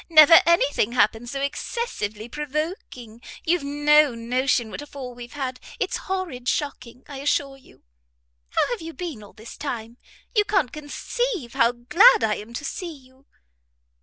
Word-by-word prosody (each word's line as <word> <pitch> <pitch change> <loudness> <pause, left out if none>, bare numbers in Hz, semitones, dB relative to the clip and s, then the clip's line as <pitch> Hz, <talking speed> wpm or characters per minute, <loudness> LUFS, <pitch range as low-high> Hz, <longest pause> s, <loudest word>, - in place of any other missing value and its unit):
Never 320 0 +9
any 340 -4 +5
thing 235 -4 0
happened 235 0 +2
so 275 +2 -4
excessively 255 - -3
provoking; 295 - -5 0.2
you've 340 -1 +1
no 295 -1 +4
notion 240 0 0
what - - -6
a 290 - -9
fall 260 -3 -8
we've 240 0 -10
had. 260 -3 -4 0.2
It's - - -1
horrid 345 -11 -3
shocking, 250 -4 -3
I 280 - -8
assure 275 0 0
you. 270 - -21 0.7
How - - +1
have 480 - -3
you 325 0 -7
been 330 - -6
all 205 - -14
this 220 +3 -11
time? 235 -4 -6 0.4
You 420 - +5
can't 385 - 0
conceive 305 - -3
how 245 -3 +3
glad 395 - +5
I 210 -1 +1
am 215 +3 -10
to 290 - -5
see 345 +4 -5
you." 260 +1 -23
275 Hz, 165 wpm, -24 LUFS, 240-315 Hz, 0.7 s, Never